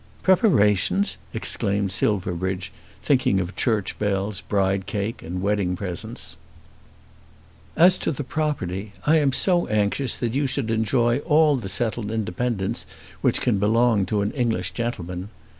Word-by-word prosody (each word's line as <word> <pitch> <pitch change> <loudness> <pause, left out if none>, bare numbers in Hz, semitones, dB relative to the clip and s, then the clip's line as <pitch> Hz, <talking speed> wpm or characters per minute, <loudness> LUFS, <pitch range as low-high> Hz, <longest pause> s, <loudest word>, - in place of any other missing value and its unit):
"Preparations!" 105 - +3
exclaimed 100 -1 -1
Silverbridge, 95 -2 -1 0.3
thinking 130 -8 +2
of 90 +1 -4
church 110 -5 -1
bells, 100 -1 -1
bride 95 -1 0
cake, 105 +2 -3
and 90 +3 -5
wedding 100 -3 0
presents. 90 -3 -5 1.4
"As 180 +3 +5
to - - -1
the 145 -1 -4
property. 105 - -3
I 155 +2 +5
am 140 -2 +2
so 175 +5 +2
anxious 105 +4 0
that 115 -2 -2
you 140 +1 +1
should 130 -3 -1
enjoy 120 +2 +2
all 150 0 +3
the 115 -7 -4
settled 110 +1 0
independence 110 0 -2 0.3
which - - +2
can 110 -6 +1
belong 110 -1 +3
to 105 +1 0
an 100 - -1
English 115 -9 -1
gentleman. 95 -6 -4
105 Hz, 135 wpm, -23 LUFS, 95-125 Hz, 1.4 s, As